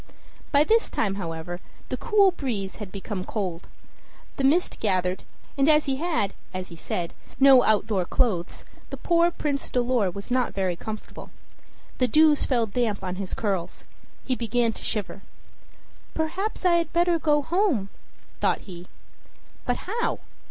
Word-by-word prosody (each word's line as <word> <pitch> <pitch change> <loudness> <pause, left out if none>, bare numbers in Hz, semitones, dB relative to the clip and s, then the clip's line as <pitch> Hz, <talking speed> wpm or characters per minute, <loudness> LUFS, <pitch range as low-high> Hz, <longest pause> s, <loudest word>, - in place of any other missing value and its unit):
By 285 0 +5
this 450 +7 +3
time, 200 -3 0
however, 165 +1 -5 0.3
the - - -1
cool 410 -4 +4
breeze 225 - -4
had 205 -3 -7
become 195 -1 -5
cold; 185 -5 -4 0.7
the 275 - -1
mist 315 +7 +2
gathered; 185 -3 0 0.3
and 275 +2 +3
as 305 0 +5
he 270 -2 0
had, 310 - 0 0.2
as 185 0 -4
he 170 - -10
said, 170 +1 -4 0.3
no 270 -2 +8
outdoor 210 -4 +2
clothes, 185 -6 -1 0.4
poor 340 0 +4
Prince 290 -5 -3
Dolor 245 -5 +1
was 200 +6 -8
not 250 -1 +1
very 190 -3 0
comfortable. 215 +5 -8 0.7
The 255 - +3
dews 305 +1 +5
fell 240 -4 +2
damp 220 -2 -1
on 185 0 -3
his 195 -2 -4
curls 190 -5 -3 0.4
he 260 - 0
began 235 -1 +1
to - - -10
shiver. 205 -2 -3 0.9
"Perhaps 360 +6 -2
I 345 -1 +5
had 335 -2 -1
better 345 0 +2
go 295 -2 +2
home," 325 - +1 0.5
thought - - +1
he. 180 -2 -10 0.8
But 245 - +1
how? 455 +5 -1
240 Hz, 150 wpm, -25 LUFS, 195-305 Hz, 0.9 s, no